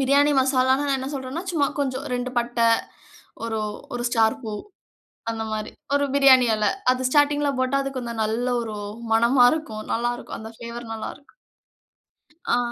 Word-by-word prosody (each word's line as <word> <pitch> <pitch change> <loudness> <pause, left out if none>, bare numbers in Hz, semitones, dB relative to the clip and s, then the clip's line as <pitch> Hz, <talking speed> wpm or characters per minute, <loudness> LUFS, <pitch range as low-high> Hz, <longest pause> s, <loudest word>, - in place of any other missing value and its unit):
பிரியாணி 280 +2 +4
மசாலானா 260 +1 +3
நான் 275 - +2
என்ன 260 - -5
சொல்றேன்னா, 270 +5 -4
சும்மா 295 -4 +2
கொஞ்சம் 270 -1 -1
2 250 0 -2
பட்ட, 240 0 -1 0.9
ஒரு, 225 -1 -2 0.4
ஒரு 240 - -2
ஸ்டார் 225 +1 +2
பூ, 220 - -5 0.8
அந்த 225 -1 -4
மாரி. 215 0 -3 0.2
ஒரு 285 0 +2
பிரியாணி 265 -3 +7
இல. 210 -1 +1 0.3
அது 255 0 -1
ஸ்டார்டிங் 290 +1 +3
ல 285 - +2
போட்டா 260 +2 +1
அது 275 - -3
கொஞ்சம் 235 -2 -4
நல்ல 225 +3 -1
ஒரு 220 -2 -5 0.4
மணமா 240 +3 +5
இருக்கும் 220 -9 -5
நல்லா 240 +1 0
இருக்கும். - - -8
அந்த 220 0 -8
ஃப்ளேவர் 235 0 -7
நல்லா 220 - -5
இருக்கும். 290 - -27 1.2
ஆ. - - +2
255 Hz, 165 wpm, -24 LUFS, 230-275 Hz, 1.2 s, பிரியாணி